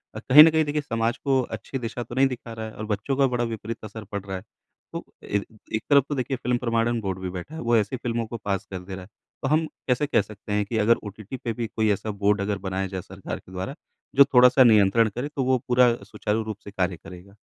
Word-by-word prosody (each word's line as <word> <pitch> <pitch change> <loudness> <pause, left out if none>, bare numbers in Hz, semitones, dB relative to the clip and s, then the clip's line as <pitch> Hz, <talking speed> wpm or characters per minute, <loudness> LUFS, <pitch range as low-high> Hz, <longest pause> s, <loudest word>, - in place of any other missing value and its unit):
अ, - - -4
कहीं 150 +4 +9
न 165 - +7
कहीं 160 0 +3
देखिए 150 +1 -1
समाज 115 -3 -1
को 135 -2 +1 0.2
अच्छी 115 +5 -6
दिशा 120 0 -4
तो 120 +1 -9
नहीं 135 +1 +5
दिखा 120 -3 -7
रहा 110 0 -5
है 110 - -8
और 110 - -6
बच्चों 105 +5 -2
का 135 -1 +4
बड़ा 120 -1 +1
विपरीत 115 -1 -5
असर 110 +1 -8
पड़ 100 - -3
रहा 95 -1 -4
है। 95 - -10 0.5
तो - - -4 0.2
एक 100 0 -1 0.3
एक 110 - 0
तरफ़ 140 -2 +6
तो 145 - -1
देखिए 130 0 -2
फ़िल्म 125 0 0
प्रमाणन 115 -1 0
बोर्ड 95 -2 -3
भी 95 0 -4
बैठा 90 - -7
है। 160 - -5
वो 120 0 +2
ऐसी 105 +3 0
फ़िल्मों 115 -1 -2
को 115 - -5
पास 100 -2 -1
कर 95 - -4
दे 95 +1 -8
रहा 95 - -8
है। 90 - -15 0.3
तो - - +1
हम 155 +3 +2 0.2
कैसे 130 +3 +1
कह 140 - +3
सकते 105 +1 -10
हैं 105 0 +1
कि 110 +3 -3
अगर 110 +2 +4
ओटीटी 105 +4 -8
पे 115 -1 -3
भी 115 +1 -3
कोई 110 -1 +2
ऐसा 105 +2 -4
बोर्ड 105 0 +3 0.2
बनाया 95 0 -2
जाए 95 -1 -5
सरकार - - -7
के - - -18
द्वारा 95 +9 -5 0.4
जो 140 - +9
थोड़ा-सा 125 +1 +7
नियंत्रण 110 -1 +5
करे 125 +4 -2
तो 135 - 0
वो 130 0 +3
पूरा 125 -1 +5
सुचारू 105 +2 -2
रूप 110 -2 -5
से 100 - -8
कार्य 90 -3 -1
करेगा? 90 +4 -13
115 Hz, 255 wpm, -25 LUFS, 100-125 Hz, 0.5 s, कहीं